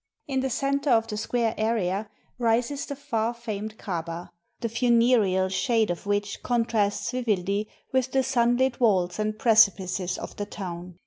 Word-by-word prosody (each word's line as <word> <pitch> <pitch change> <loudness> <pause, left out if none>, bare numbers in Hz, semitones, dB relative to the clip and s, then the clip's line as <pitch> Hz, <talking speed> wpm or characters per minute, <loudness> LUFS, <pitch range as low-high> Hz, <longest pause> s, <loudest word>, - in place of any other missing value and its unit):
In 270 -2 0
the 265 0 -1
center 280 +3 0
of 225 -2 +4
the 215 - -4
square 225 +1 0
area 215 -2 0 0.3
rises 240 +4 0
the 280 - -4
far 235 -4 -2
famed 215 -2 -5
Kabah, 170 -2 -5 0.3
the 230 - -1
funereal 230 -5 +3
shade 220 +1 +1
of 175 +3 -6
which 205 0 -1
contrasts 220 -4 0
vividly 210 -4 -1 0.2
with 260 0 +1
the 265 0 +2
sunlit 245 0 +2
walls 185 -6 +2
and 215 0 -1
precipices 195 -5 +3
of - - -7
the 205 - -3
town. 180 -3 -7
220 Hz, 150 wpm, -26 LUFS, 200-245 Hz, 0.3 s, of